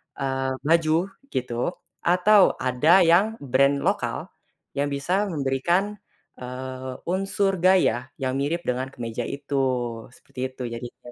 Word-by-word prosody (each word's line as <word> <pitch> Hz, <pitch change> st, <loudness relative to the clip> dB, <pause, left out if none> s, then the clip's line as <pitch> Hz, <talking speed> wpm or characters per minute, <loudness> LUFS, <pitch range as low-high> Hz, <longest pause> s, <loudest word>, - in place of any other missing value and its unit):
eee, 135 Hz, -1 st, -2 dB
baju 165 Hz, +3 st, +2 dB, 0.2 s
gitu, 125 Hz, -, -2 dB, 0.2 s
atau 185 Hz, +3 st, +4 dB
ada 150 Hz, +9 st, +4 dB
yang 190 Hz, +7 st, +4 dB
brand 140 Hz, +1 st, +2 dB
lokal -, -, -1 dB, 0.4 s
yang 140 Hz, +1 st, 0 dB
bisa 180 Hz, +9 st, 0 dB
memberikan, 170 Hz, +6 st, 0 dB, 0.4 s
eee, 130 Hz, +1 st, -6 dB
unsur 195 Hz, +2 st, 0 dB
gaya 175 Hz, -8 st, +3 dB
yang 130 Hz, 0 st, -1 dB
mirip 165 Hz, +5 st, -1 dB
dengan 125 Hz, +1 st, -1 dB
kemeja 120 Hz, -1 st, -4 dB
itu, 140 Hz, 0 st, -5 dB, 0.6 s
seperti -, -, -14 dB
itu 130 Hz, -1 st, -8 dB
jadinya. 120 Hz, +1 st, -9 dB
140 Hz, 120 wpm, -24 LUFS, 130-180 Hz, 0.6 s, atau